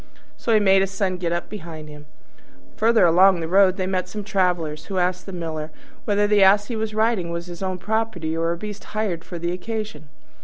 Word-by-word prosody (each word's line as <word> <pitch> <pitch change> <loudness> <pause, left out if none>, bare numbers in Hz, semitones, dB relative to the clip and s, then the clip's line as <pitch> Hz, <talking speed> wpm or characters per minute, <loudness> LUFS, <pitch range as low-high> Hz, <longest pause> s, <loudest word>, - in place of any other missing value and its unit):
So 235 - -2
he 220 - +5
made 195 -2 +4
his 195 - 0
Son 195 -2 -1
get 175 -2 -2
up 175 0 -2
behind 165 -6 -8
him. 150 0 -12 0.7
Further 225 -1 +4
along 180 +2 +5
the 165 - -3
road 190 +1 +4
they 185 - -1
met 185 -1 -2
some 210 -1 -5
travellers, 175 -6 -1
who 195 - -4
asked 180 +1 0
the - - -6
Miller 160 -3 -4 0.4
whether 205 -1 +2
the 205 -1 +3
Ass 200 +3 +5
he 235 - -2
was 220 -1 -3
riding 215 -5 +1
was 170 0 -4
his 175 0 -9
own 185 -1 -2
property, 190 -5 -2
or 165 +1 0
a 170 - -2
beast 210 +2 -7
hired 190 -6 -1
for 175 - -7
the 170 +1 -2
occasion. 185 -5 -5
185 Hz, 220 wpm, -23 LUFS, 170-205 Hz, 0.7 s, he